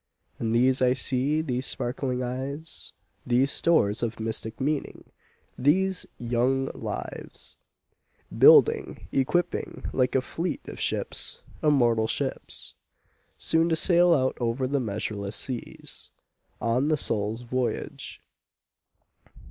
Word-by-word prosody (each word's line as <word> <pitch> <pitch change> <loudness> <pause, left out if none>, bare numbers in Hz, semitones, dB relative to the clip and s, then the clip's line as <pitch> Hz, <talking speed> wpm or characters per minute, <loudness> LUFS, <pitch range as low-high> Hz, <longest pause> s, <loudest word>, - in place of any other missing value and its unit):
And 115 -1 -1
these 130 +3 +3
I 125 -1 +4
see, 135 +4 +2
these 130 -3 -1
sparkling 125 0 -2
eyes, 135 +6 -5 0.3
These 125 +3 +2
stores 110 -11 +3
of 115 -2 -3
mystic 110 0 -2
meaning, 145 +2 -2 0.6
these 185 +7 +2
young 125 +3 0
lives, - - -6 0.8
Building, - - +5
equipping 155 +7 -1
like 130 0 +1
a 130 - +4
fleet 165 +4 -4
of - - -8
ships, - - -1 0.2
immortal 120 -7 +3
ships, - - -3 0.6
Soon 165 +1 +2
to 165 - +2
sail 175 +1 +4
out 130 -5 +2
over 120 +2 0
the 140 +2 0
measureless 105 -2 -2
seas, 125 -3 -4 0.5
On 120 +5 +1
the 155 0 +2
soul's 110 -2 +2
voyage. 125 +1 -4
130 Hz, 110 wpm, -26 LUFS, 120-145 Hz, 0.8 s, Building